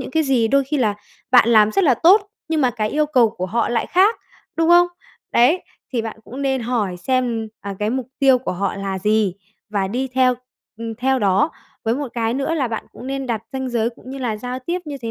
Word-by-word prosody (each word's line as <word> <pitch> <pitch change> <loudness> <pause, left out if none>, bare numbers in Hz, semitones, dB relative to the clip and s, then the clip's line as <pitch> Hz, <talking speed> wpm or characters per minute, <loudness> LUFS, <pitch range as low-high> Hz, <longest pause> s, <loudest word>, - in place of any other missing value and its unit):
những 260 - -6
cái 320 +3 +2
gì. 250 -5 +2
Đôi 275 +2 +3
khi 295 +3 -2
là 220 -6 +1 0.4
bạn 245 -2 +6
làm 215 -2 +5
rất 390 - +2
là 265 -5 +5
tốt, 390 - +5 0.2
nhưng 320 -1 +1
mà 255 -2 +3
cái 215 -3 -2
yêu 300 0 +1
cầu 250 -7 +3
của 185 -4 -4
họ 230 +5 0
lại 240 - 0
khác, 395 +5 +3 0.4
đúng 330 0 +2
không? 350 0 +7 0.5
Đấy, 275 +10 +4 0.3
thì 235 -3 0
bạn 225 -1 -6
cũng 265 +4 -7
nên 265 -2 0
hỏi 225 -6 -1
xem, 235 +1 -1
à, 200 -1 -6
cái 210 +1 0
mục 255 0 -2
tiêu 265 -2 +5
của 250 - -4
họ 195 +2 -2
là 195 -1 -3
gì, 210 -1 +1 0.3
và 200 -2 -1
đi 255 +6 -2
theo, 255 0 +3 0.4
ừm, 225 0 -5
theo 260 +3 +1
đó. 205 - +2 0.3
Với 225 +1 +1
một 280 -1 -3
cái 230 -1 -1
nữa 275 +4 -1
là 275 -6 0
bạn 225 -1 -4
cũng 245 - -10
nên 270 0 -3
đặt 225 -3 -2
ranh 265 -1 -3
giới 235 -1 0
cũng 250 +2 -13
như 275 - -6
là 235 -5 -2
giao 250 +3 -5
tiếp 340 +8 -3
như 290 -2 -6
thế 230 - -3
250 Hz, 240 wpm, -20 LUFS, 220-270 Hz, 0.5 s, không